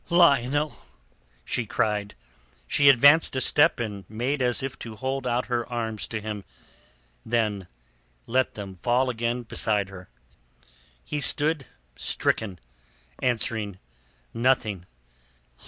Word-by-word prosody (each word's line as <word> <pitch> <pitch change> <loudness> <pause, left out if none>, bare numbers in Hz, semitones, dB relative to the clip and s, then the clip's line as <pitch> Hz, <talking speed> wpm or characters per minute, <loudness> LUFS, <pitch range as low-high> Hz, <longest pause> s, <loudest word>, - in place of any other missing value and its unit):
"Lionel!" 145 -4 +3 0.7
she - - -2
cried. 105 -1 -1 0.5
She 140 - +5
advanced 140 +4 +6
a - - +1
step 150 +1 +4
and 105 -4 -4
made 125 +6 -2
as 125 0 +1
if 135 -1 -5
to 115 -2 -8
hold 130 +2 -3
out 125 +1 0
her 120 -1 -1
arms 110 -3 -2
to 115 - -4
him, 105 -1 -5 0.8
then 105 -5 -1 0.6
let 130 +2 0
them 100 -2 -7
fall 125 +7 +1
again 120 +1 -2
beside 105 -3 0
her. 90 -2 -11 1.0
He 150 - -3
stood 150 +1 +2 0.3
stricken, 100 -5 -1 0.6
answering 110 -5 -1 0.6
nothing. 115 -7 0
120 Hz, 115 wpm, -26 LUFS, 105-130 Hz, 1.0 s, advanced